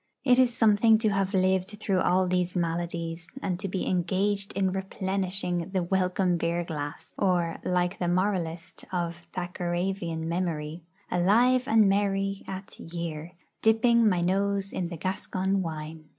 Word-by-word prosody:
It 250 -2 +5
is 255 -2 +5
something 220 0 +5
to 220 0 +1
have 195 0 0
lived 190 +2 +1
through 195 -3 +1
all 185 +1 +2
these 180 0 0
maladies, 170 -1 -2
and 180 -2 -2
to 195 - -3
be 190 0 -2
engaged 195 +2 0
in 190 -1 +1
replenishing 190 -2 -2
the 185 -2 +1
welcome 185 0 +1
beer 170 +1 0
glass, 145 -3 -6
or, 175 -4 +1
like 180 0 0
the 175 - 0
moralist 175 -1 -1
of 170 -2 -1 0.2
Thackeravian 175 -1 -2
memory, 165 -2 -2 0.3
Alive 240 +8 +3
and 220 -3 +5
merry 195 0 0
at 190 0 -8
year, 170 0 -6 0.3
Dipping 225 0 +4
my 180 -3 +1
nose 195 +2 0
in 180 - -2
the 170 -1 -6
Gascon 190 +2 -1
wine. 155 -2 -6
185 Hz, 145 wpm, -27 LUFS, 175-195 Hz, 0.3 s, It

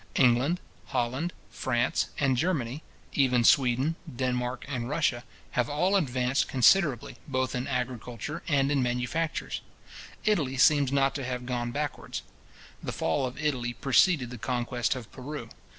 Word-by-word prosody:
England, 130 +7 +4 0.3
Holland, 130 +8 -1 0.2
France, 120 -2 0
and 135 -2 +3
Germany; 140 -3 -1 0.3
even 125 -3 +3
Sweden, 130 +5 +4 0.2
Denmark, 125 0 -1
and 125 -3 -3
Russia, 150 -6 +1 0.3
have 125 -1 0
all 180 +7 +2
advanced 130 -6 +1
considerably, 135 - +3
both 130 -2 -1
in 125 0 -2
agriculture 125 +3 -3
and 140 -3 +2
in 140 -2 +2
manufactures. 125 +6 -1 0.6
Italy 150 -11 +1
seems 140 0 +5
not 135 -1 +3
to 140 - -4
have 125 -1 -3
gone 120 -1 -2
backwards. 145 +1 -4 0.6
The - - -4
fall 105 +11 0
of 125 - -8
Italy 130 -5 -1
preceded 135 - +3
the 125 - -7
conquest 120 +1 -1
of 125 -4 -8
Peru. 130 -2 -7
130 Hz, 135 wpm, -28 LUFS, 125-145 Hz, 0.6 s, seems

